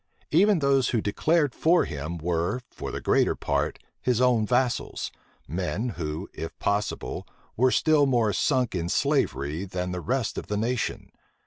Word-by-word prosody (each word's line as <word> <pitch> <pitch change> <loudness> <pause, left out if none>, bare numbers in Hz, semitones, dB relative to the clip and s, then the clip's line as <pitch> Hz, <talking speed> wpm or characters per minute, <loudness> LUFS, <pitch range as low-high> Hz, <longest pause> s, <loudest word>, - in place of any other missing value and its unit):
Even 200 +5 +5
those 140 -4 +2
who 120 - +1
declared 145 +7 +1
for 175 +2 +3
him, 75 +3 -5
were, 85 +6 -1
for - - -6
the - - -4
greater - - +2
part, - - -1 0.2
his 125 -2 +1
own 120 -4 +3
vassals; 125 +1 0 0.4
men 95 - -2
who, 80 -2 -4
if 80 - -6
possible, 100 +1 -2 0.3
were 130 +3 +4
still 150 +1 +4
more 115 -5 +2
sunk 130 -4 +1
in 85 -2 -2
slavery 75 +2 0
than 90 -1 -3
the 90 0 -3
rest 125 +3 -1
of - - -10
the 105 - -1
nation. 120 +3 -2
110 Hz, 155 wpm, -26 LUFS, 90-130 Hz, 0.4 s, Even